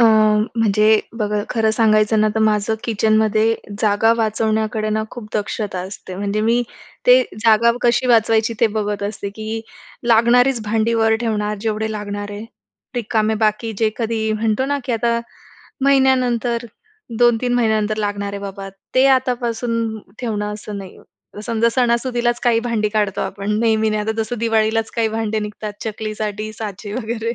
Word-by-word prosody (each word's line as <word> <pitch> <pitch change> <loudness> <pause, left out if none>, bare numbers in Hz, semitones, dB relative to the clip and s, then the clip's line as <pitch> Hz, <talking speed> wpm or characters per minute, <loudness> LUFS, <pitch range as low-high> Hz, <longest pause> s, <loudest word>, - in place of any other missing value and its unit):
अ, - - +7 0.5
म्हणजे 215 -1 +3 0.3
बघा 210 -1 0
खरं 220 -2 +2
सांगायचं 215 -1 +3
ना 215 - +3
तर 220 - 0
माझं 215 0 +2
किचनमध्ये 220 0 +2 0.3
जागा 215 +1 +3
वाचवण्याकडे 220 0 0
ना 215 0 0
खूप 240 -3 -8
दक्षता 210 -2 -3
असते. 185 0 -8
म्हणजे 200 +2 -1
मी 230 +3 +2 0.4
ते 250 +1 +8 0.2
जागा 230 +1 +5
कशी 245 +1 +2
वाचवायची 225 -1 +3
ते 230 - +6
बघत 205 -1 -2
असते, 200 0 -4
की 220 +2 -5 0.5
लागणारीच 240 +2 +4
भांडी 220 +2 +1
वर 225 -1 +3
ठेवणार, 210 -2 -1
जेवढे 220 -1 -1
लागणार 205 -1 -5
आहे. 205 +2 -7 0.5
रिकामे 220 -2 0
बाकी 215 +1 0
जे 220 -1 +2
कधी 220 -2 -1
म्हणतो 220 +3 0
ना 285 +1 0
की 250 - -2
आता 235 +1 +1 0.6
महिन्यानंतर, 250 -3 +2 0.5
2-3 240 0 +3
महिन्यानंतर 220 -3 +1
लागणार 205 -1 -2
आहे 200 - -5
बाबा, 195 0 -6 0.3
ते 260 +1 +5
आतापासून 235 -3 -2 0.2
ठेवणं 210 -3 -2
असं 210 -1 -7
नाही. 190 -2 -10 0.5
समजा 230 -1 +2
सणासुदीलाच 240 0 +1
काही 235 -2 +3
भांडी 230 -3 0
काढतो 210 -2 -1
आपण, 200 +1 -4
नेहमी 220 -1 +2
नाही. 215 0 0
आता 220 +1 -1
जसं 240 +1 -5
दिवाळीलाच 225 0 +1
काही 225 -1 +2
भांडे 220 0 -2
निघतात 210 0 -5
चकलीसाठी 215 0 -4
साचे 210 -1 -7
वगैरे. 230 0 -3
220 Hz, 150 wpm, -19 LUFS, 210-235 Hz, 0.6 s, ते